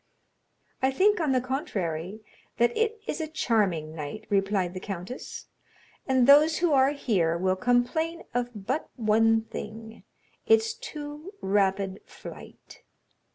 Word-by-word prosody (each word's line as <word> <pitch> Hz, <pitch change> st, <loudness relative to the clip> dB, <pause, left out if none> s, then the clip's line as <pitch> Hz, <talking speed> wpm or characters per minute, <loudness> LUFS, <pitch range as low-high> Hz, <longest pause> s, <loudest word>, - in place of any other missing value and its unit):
"I 265 Hz, -, +3 dB
think, 400 Hz, +10 st, +3 dB
on 310 Hz, -5 st, +1 dB
the 260 Hz, -, +3 dB
contrary, 210 Hz, -, -3 dB, 0.4 s
that 240 Hz, 0 st, +2 dB
it 450 Hz, 0 st, 0 dB
is -, -, -3 dB
a 315 Hz, -, -2 dB
charming 200 Hz, -, 0 dB
night," 155 Hz, +8 st, -6 dB
replied 195 Hz, -2 st, +1 dB
the 185 Hz, -, -5 dB
countess, 195 Hz, +5 st, -7 dB, 0.6 s
"and 260 Hz, -2 st, +4 dB
those 300 Hz, +4 st, +6 dB
who 340 Hz, -3 st, +2 dB
are 265 Hz, 0 st, +5 dB
here 195 Hz, -, 0 dB
will 185 Hz, +1 st, +1 dB
complain 245 Hz, -, 0 dB
of 245 Hz, 0 st, 0 dB, 0.2 s
but 310 Hz, -, -2 dB
one 225 Hz, -1 st, +3 dB
thing, 220 Hz, 0 st, -8 dB, 0.4 s
that 450 Hz, -, +6 dB
of -, -, +9 dB
its 445 Hz, 0 st, -3 dB
too 305 Hz, -5 st, -8 dB
rapid 195 Hz, 0 st, 0 dB
flight." -, -, -12 dB
240 Hz, 140 wpm, -27 LUFS, 195-295 Hz, 0.6 s, of